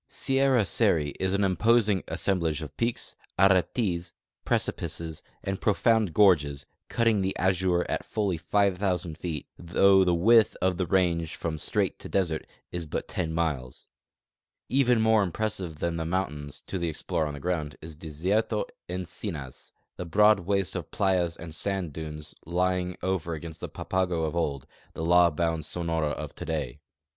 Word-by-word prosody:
Sierra 135 -4 +2
Seri 80 -3 +2
is 95 +1 +1
an 100 - +1
imposing 100 +1 +3
assemblage 85 -5 0
of 75 - -9
peaks, 115 0 -1 0.2
aretes, 95 -2 +2 0.3
precipices, 80 -1 -2 0.2
and 95 0 -3
profound 110 -1 +3
gorges, 75 -8 +3 0.2
cutting 115 -4 +2
the 95 0 -1
azure 90 -1 +2
at - - -2
fully 100 -4 -1
5,000 90 -1 0
feet, 80 -3 -4
though 95 +3 +5
the 90 -2 +2
width 110 +6 +5
of 90 -1 +1
the 90 - -1
range 85 -3 +1
from 80 -1 -3
strait - - 0
to - - -8
desert 85 -5 0 0.2
is 85 -2 -4
but - - -3
10 85 -4 -2
miles. 75 -7 -2 0.8
Even 125 -3 +3
more 110 -1 +4
impressive 95 -3 -2
than 85 +2 -2
the 80 - -2
mountains, 75 -6 -3
to 95 - -4
the 85 -1 -1
explorer 80 0 -2
on 75 - -5
the - - -7
ground, 75 -2 -2
is 80 0 -10
Desierto 90 +8 -1 0.2
Encinas 85 - -6
— - - -52
the 90 - -4
broad 105 +4 +5
waste 95 0 0
of - - -4
playas 90 -4 +1
and 80 -1 -8
sand 95 -3 -2
dunes 75 -1 -6
lying 90 +1 0
over 90 -3 -1
against 80 +1 -8
the - - -5
Papago 90 -3 -1
of 80 +1 -2
old, 70 -6 -1 0.3
the 80 - -4
law 85 0 +6
bound 80 0 -1
Sonora 80 -1 -1
of - - -5
today. 75 -4 -4
90 Hz, 155 wpm, -27 LUFS, 80-95 Hz, 0.8 s, law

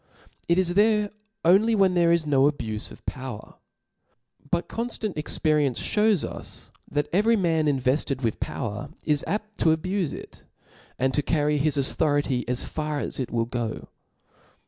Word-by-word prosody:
It 170 - +3
is 180 -2 +3
there 210 +1 +3 0.3
only 205 +6 +5
wh^n 195 -3 +4
there 170 -1 +3
is 170 -2 +2
no 140 -1 +4
abufe 110 -7 -5
of - - -14
power; 130 -5 -7 0.9
but 175 +2 0
conftant 230 -3 -3
experience 150 -3 +1
fhews 210 -5 +2
Us, - - -8 0.2
that 145 0 -1
every 220 +5 +4
man 165 -6 +1
invefted 135 0 +1
with 115 -2 -1
power 105 -5 -4 0.2
is 150 -2 +2
apt 215 +1 -4
to 160 -1 +4
abufe 185 -1 -2
it; - - -10 0.6
and 130 +1 +1
to 145 - +2
carry 150 0 +1
his 150 0 +2
authority 140 -2 +1
as 125 0 0
far 150 -1 -3
as - - -3
it 130 - -2
will 115 -1 0
go. 115 - -4
150 Hz, 155 wpm, -25 LUFS, 130-185 Hz, 0.9 s, only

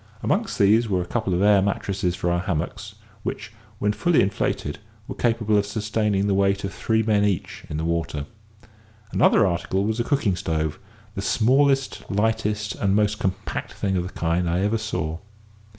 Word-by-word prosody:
Amongst - - 0
these 110 +3 +4
were 90 -2 +1
a - - -9
couple 110 +1 -2
of 90 - +1
air 100 -1 +6
mattresses 95 -2 -1
for 90 -1 -1
our 85 - +1
hammocks, 95 +4 -3 0.3
which, 110 +1 -5 0.3
when 105 0 +1
fully 175 +7 +2
inflated, 75 -6 -2 0.3
were - - -4
capable 110 -3 +1
of 100 - 0
sustaining 105 -1 0
the 100 - +1
weight 100 0 +2
of 100 0 -3
three 110 0 +1
men 105 -2 +2
each 100 -3 -2
in 75 - -3
the 80 - -2
water. 80 -3 -2 0.9
Another 105 - +4
article 95 +1 0
was 110 +2 -1
a - - +2
cooking 120 - +1
stove, 80 -4 -2 0.3
the 95 - -4
smallest, 135 +6 +2
lightest, 105 0 0
and 100 -1 0
most 105 0 +1
compact 95 0 -3
thing 95 -1 -1
of 90 - +1
the 90 +2 -7
kind 85 +1 0
I 85 +2 +1
ever 105 +3 +1
saw. 90 -7 -3
100 Hz, 180 wpm, -24 LUFS, 90-110 Hz, 0.9 s, air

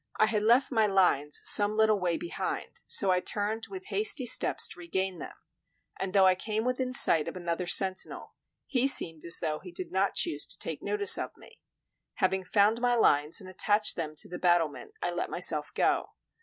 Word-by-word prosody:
I 215 - +3
had 215 -1 -2
left 240 +6 +2
my 220 -4 +1
lines 180 -7 0
some 210 +1 +5
little 220 -1 +2
way 175 -2 -2
behind, 345 - -6
so 195 -2 +2
I 180 - +1
turned 210 +4 -4
with 375 -1 -10
hasty 410 - +1
steps 235 - +3
to - - -13
regain 185 +1 -4
them; - - -10 0.6
and 190 -1 -4
though 195 -1 +3
I 185 - +4
came 215 +4 -4
within 255 0 -3
sight 165 -10 +5
of - - -7
another 175 0 -5
sentinel, 190 0 0 0.3
he 260 -1 0
seemed 165 - +5
as 170 - +3
though 155 -1 -3
he 180 - -13
did 175 0 -7
not 190 +1 -1
choose 340 - 0
to - - -5
take - - -5
notice 420 -1 +2
of - - -7
me. - - -16 0.5
Having 190 -1 -1
found 210 +4 +1
my 245 -1 +1
lines 150 -6 +2
and 190 - -12
attached 205 +3 +1
them 155 -2 -6
to - - -3
the 180 - -9
battlement, 175 - -1
I - - -1
let - - -5
myself - - +1
go. - - -1
195 Hz, 195 wpm, -27 LUFS, 180-225 Hz, 0.6 s, some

